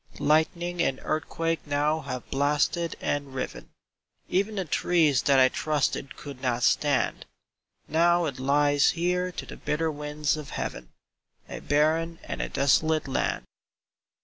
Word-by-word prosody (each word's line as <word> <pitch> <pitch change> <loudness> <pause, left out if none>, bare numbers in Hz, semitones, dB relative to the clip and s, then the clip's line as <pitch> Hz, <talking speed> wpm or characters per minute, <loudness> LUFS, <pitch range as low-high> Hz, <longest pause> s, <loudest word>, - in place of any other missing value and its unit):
Lightning 170 +3 +1
and 135 -5 0
earthquake 165 +1 -1
now 145 +2 +1
have 130 -4 -6
blasted 150 +4 +1
and 140 -2 -2
riven; 95 - -5 0.6
Even 200 +4 0
the 190 -2 -2
trees 155 -4 +2
that 140 -1 +3
I 130 -1 +7
trusted 145 0 -1
could 140 -3 -9
not 125 -2 -1
stand: 145 -3 +1 0.6
Now 170 +2 +3
it 140 -4 -4
lies 145 +1 +3
here 180 +1 0
to - - -6
the - - -10
bitter 160 +1 -1
winds 150 0 -2
of 150 -2 -7
heaven, 60 -1 -5 0.6
A - - -7
barren 160 +3 +1
and - - -5
a - - -3
desolated 150 +2 +2
land. 130 - -1
150 Hz, 140 wpm, -27 LUFS, 140-165 Hz, 0.6 s, I